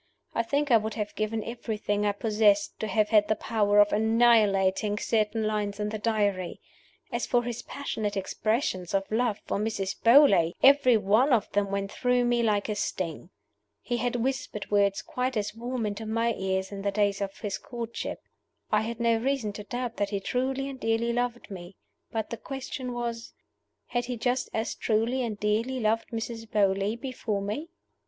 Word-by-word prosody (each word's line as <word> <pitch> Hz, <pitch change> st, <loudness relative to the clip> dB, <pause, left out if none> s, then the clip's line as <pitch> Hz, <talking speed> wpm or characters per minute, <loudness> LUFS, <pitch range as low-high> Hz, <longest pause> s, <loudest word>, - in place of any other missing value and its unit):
I -, -, +1 dB
think 285 Hz, +4 st, 0 dB
I 230 Hz, -, +8 dB
would 220 Hz, 0 st, -3 dB
have 210 Hz, -2 st, -3 dB
given 215 Hz, 0 st, -2 dB
everything 210 Hz, -3 st, -2 dB
I -, -, +3 dB
possessed 210 Hz, -1 st, +2 dB
to 220 Hz, -, -2 dB
have 215 Hz, -1 st, +1 dB
had 210 Hz, -2 st, +4 dB
the 215 Hz, -, +2 dB
power 205 Hz, -2 st, +1 dB
of 205 Hz, 0 st, +5 dB
annihilating 210 Hz, -3 st, +3 dB
certain 220 Hz, 0 st, 0 dB
lines 210 Hz, -1 st, -1 dB
in 210 Hz, 0 st, -1 dB
the 215 Hz, 0 st, -4 dB
Diary. 205 Hz, -5 st, 0 dB, 0.5 s
As -, -, -2 dB
for 245 Hz, -2 st, +2 dB
his 240 Hz, -1 st, -4 dB
passionate 215 Hz, -7 st, -4 dB
expressions 195 Hz, -2 st, -1 dB
of 195 Hz, +1 st, -1 dB
love 225 Hz, -1 st, +1 dB
for -, -, -1 dB
Mrs. 200 Hz, -3 st, -2 dB
Beauly, 230 Hz, -, +6 dB
every 270 Hz, -4 st, +6 dB
one 215 Hz, +7 st, +3 dB
of 230 Hz, -5 st, +2 dB
them 200 Hz, -1 st, +1 dB
went 200 Hz, 0 st, -2 dB
through 250 Hz, -1 st, +1 dB
me 240 Hz, 0 st, +2 dB
like 210 Hz, -3 st, +1 dB
a 215 Hz, -, -1 dB
sting. 185 Hz, -5 st, -3 dB, 0.5 s
He 240 Hz, -, -1 dB
had 245 Hz, +1 st, -1 dB
whispered 245 Hz, -4 st, -3 dB
words 200 Hz, -1 st, +2 dB
quite 250 Hz, -1 st, -2 dB
as 210 Hz, -1 st, -2 dB
warm 240 Hz, +1 st, -3 dB
into 210 Hz, +1 st, -4 dB
my 230 Hz, +1 st, +1 dB
ears 190 Hz, -1 st, -2 dB
in 200 Hz, -1 st, -6 dB
the 200 Hz, -, 0 dB
days 200 Hz, 0 st, +1 dB
of 195 Hz, -1 st, -4 dB
his 205 Hz, -3 st, -4 dB
courtship. 235 Hz, -1 st, -6 dB, 0.5 s
I 210 Hz, -, +4 dB
had 230 Hz, +1 st, -4 dB
no 230 Hz, -1 st, +3 dB
reason 240 Hz, -3 st, -1 dB
to 210 Hz, -, -7 dB
doubt 245 Hz, +2 st, -4 dB
that 205 Hz, -1 st, 0 dB
he 200 Hz, -1 st, -2 dB
truly 265 Hz, +6 st, -1 dB
and 270 Hz, -1 st, -7 dB
dearly 225 Hz, +1 st, 0 dB
loved 240 Hz, -2 st, -2 dB
me. 180 Hz, 0 st, -9 dB, 0.4 s
But 220 Hz, -2 st, -3 dB
the 235 Hz, -, -3 dB
question 260 Hz, 0 st, -5 dB
was, 235 Hz, -1 st, -4 dB, 0.6 s
Had 240 Hz, 0 st, -1 dB
he 245 Hz, -1 st, -4 dB
just 250 Hz, +2 st, 0 dB
as 220 Hz, +1 st, -2 dB
truly 230 Hz, +4 st, 0 dB
and 220 Hz, -4 st, -3 dB
dearly 225 Hz, +5 st, 0 dB
loved 225 Hz, 0 st, 0 dB
Mrs. 225 Hz, 0 st, -5 dB
Beauly 200 Hz, +2 st, +1 dB
before 230 Hz, -6 st, -3 dB
me? 250 Hz, +12 st, -4 dB
220 Hz, 185 wpm, -27 LUFS, 205-240 Hz, 0.6 s, I